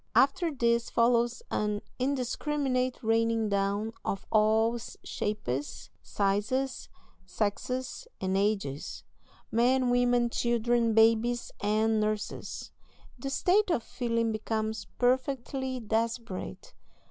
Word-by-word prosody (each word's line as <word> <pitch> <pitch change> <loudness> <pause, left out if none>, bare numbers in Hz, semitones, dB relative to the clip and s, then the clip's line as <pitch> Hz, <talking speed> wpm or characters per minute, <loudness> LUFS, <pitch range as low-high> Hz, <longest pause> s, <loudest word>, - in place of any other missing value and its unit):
After 330 +5 +4
this 235 -3 +1
follows 235 0 +2
an 210 -1 0 0.2
indiscriminate 260 0 0
raining 225 0 +2
down 200 +2 0
of 195 - -3
all 220 +2 +3
shapes, 175 - -4
sizes, 215 +7 -1 0.4
sexes, 250 - -2
and 190 0 -1
ages 195 -9 -1 0.5
men, 250 +2 +3
women, 245 -1 +3
children, 235 -1 +1
babies, 230 +2 +3
and 215 +1 +2
nurses. 215 0 -3 0.5
The 275 - -3
state 375 +8 +3
of 290 -10 +1
feeling 230 -2 -1
becomes 220 -1 -2
perfectly 260 +1 0
desperate. 230 - -3
230 Hz, 95 wpm, -29 LUFS, 215-250 Hz, 0.5 s, After